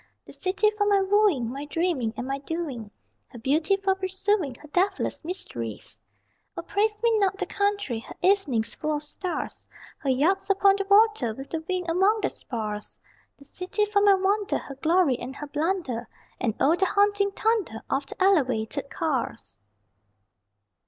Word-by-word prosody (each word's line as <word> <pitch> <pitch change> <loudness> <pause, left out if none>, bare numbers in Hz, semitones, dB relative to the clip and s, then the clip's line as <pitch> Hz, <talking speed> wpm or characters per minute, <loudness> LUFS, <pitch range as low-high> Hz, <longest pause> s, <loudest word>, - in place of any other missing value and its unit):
The - - -12
city 400 +3 +1
for 420 -1 0
my 405 -1 +4
wooing, 385 - +2
My 275 +3 -5
dreaming 300 -7 0
and 245 - -3
my 275 +1 -3
doing; 280 -8 -5 0.4
Her - - -12
beauty 305 - +2
for 390 -1 +1
pursuing, 380 - -1
Her 300 - -14
deathless 380 +4 0
mysteries. 115 - -6 0.6
O - - -4
praise 425 +4 0
me 465 -1 +4
not 390 -1 +1
the - - -1
country, 405 - -1
Her - - -11
evenings 340 - +2
full 305 0 -2
of 295 - -3
stars, 355 +4 -5 0.3
Her 275 - -2
yachts 375 +10 +2
upon 395 0 +4
the 395 - -1
water 400 - +4
with 270 +2 -9
the 325 - -2
wind 365 -1 -1
among 385 +6 +3
their 390 - 0
spars 215 -3 -5 0.4
The 280 - -14
city 365 +7 -1
for 410 -1 +1
my 400 -1 +6
wonder, 400 +2 +1
Her 275 - -8
glory 310 -1 +2
and 265 - -7
her 295 - -6
blunder, 295 - -2 0.3
And 225 -4 -1
O 305 +5 +4
the 380 - +2
haunting 405 0 +2
thunder 405 - -1
Of 275 +1 -1
the - - -10
Elevated 275 - +1
cars! 260 - -3
350 Hz, 165 wpm, -26 LUFS, 270-400 Hz, 0.6 s, my